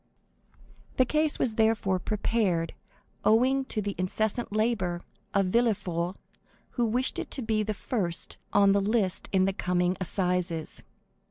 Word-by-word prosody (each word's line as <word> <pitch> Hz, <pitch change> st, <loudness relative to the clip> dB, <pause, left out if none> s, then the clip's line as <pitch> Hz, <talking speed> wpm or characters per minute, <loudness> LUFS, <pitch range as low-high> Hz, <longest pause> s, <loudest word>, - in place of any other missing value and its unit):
The 255 Hz, -, +5 dB
case 305 Hz, +3 st, +2 dB
was 225 Hz, -4 st, -1 dB
therefore 215 Hz, -4 st, +2 dB
prepared 195 Hz, -4 st, 0 dB, 0.5 s
owing 260 Hz, +5 st, +3 dB
to 215 Hz, -5 st, -2 dB
the 200 Hz, 0 st, -2 dB
incessant 215 Hz, +5 st, -1 dB
labor 205 Hz, -5 st, 0 dB, 0.3 s
of 195 Hz, -1 st, +2 dB
Villefort, 185 Hz, -5 st, 0 dB, 0.6 s
who 240 Hz, -, 0 dB
wished 250 Hz, +4 st, 0 dB
it -, -, -5 dB
to 265 Hz, -, -2 dB
be 220 Hz, -1 st, +1 dB
the 215 Hz, 0 st, -2 dB
first 185 Hz, -7 st, -3 dB
on 200 Hz, -1 st, +5 dB
the 200 Hz, 0 st, +3 dB
list 200 Hz, -2 st, 0 dB
in 190 Hz, -1 st, +3 dB
the 195 Hz, -, 0 dB
coming 180 Hz, -1 st, 0 dB
assizes. 180 Hz, -3 st, -1 dB
205 Hz, 140 wpm, -28 LUFS, 185-225 Hz, 0.6 s, The